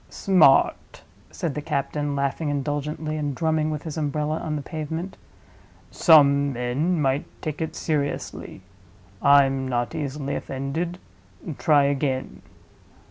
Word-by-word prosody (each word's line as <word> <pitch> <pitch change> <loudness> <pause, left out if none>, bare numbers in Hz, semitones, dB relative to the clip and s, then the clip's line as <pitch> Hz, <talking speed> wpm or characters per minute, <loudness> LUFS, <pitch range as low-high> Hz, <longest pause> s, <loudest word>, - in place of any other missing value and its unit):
"Smart," 180 -8 +3 0.3
said 165 -4 -3
the 150 - -4
captain, 145 0 -2
laughing 140 +3 -1
indulgently, 145 +2 -3
and 145 -2 -2
drumming 160 -1 0
with 150 -1 -4
his 160 -1 -6
umbrella 150 +1 -1
on 155 -2 -3
the 145 - -4
pavement. 160 +5 -5 0.8
"Some 140 -4 +5
men 130 +9 -1
might 135 0 +1
take 155 -1 -5
it 160 - -3
seriously. 145 - -3 0.6
I'm 135 -2 +4
not 120 -1 -1
easily 140 -1 -3
offended. 150 +7 -4 0.6
Try 150 -4 +4
again." 140 -2 -1
145 Hz, 120 wpm, -24 LUFS, 140-155 Hz, 0.8 s, Some